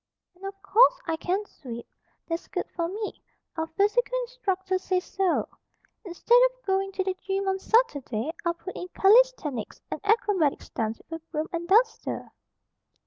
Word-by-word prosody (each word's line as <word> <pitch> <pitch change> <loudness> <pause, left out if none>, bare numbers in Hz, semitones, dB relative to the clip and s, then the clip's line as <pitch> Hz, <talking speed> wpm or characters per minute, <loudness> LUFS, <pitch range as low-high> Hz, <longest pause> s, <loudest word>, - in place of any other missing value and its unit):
"And, 360 +2 -21
of 390 0 -8
course, 460 +5 +5
I 325 - 0
can 370 +5 -1
sweep. 235 - -9 0.4
That's 330 0 -3
good - - -3
for 335 -1 0
me. 415 +4 -5 0.3
Our 320 -1 -2
physical 420 +9 +1
instructor 385 -7 -2
says 370 -1 0
so. 385 -3 0 0.6
Instead 420 +6 +3
of - - -28
going 390 0 +1
to 380 - 0
the 380 0 -1
gym 390 0 -2
on 385 0 +1
Saturday, 300 - +1
I'll 340 0 0
put 370 +2 -8
in 360 - -5
calisthenics 390 - +3
and - - -4
acrobatic 405 -8 +2
stunts 220 -1 -3
with 325 0 -5
a - - -47
broom 310 0 -2
and 340 0 -3
duster." 450 +5 +2
380 Hz, 160 wpm, -27 LUFS, 330-420 Hz, 0.6 s, course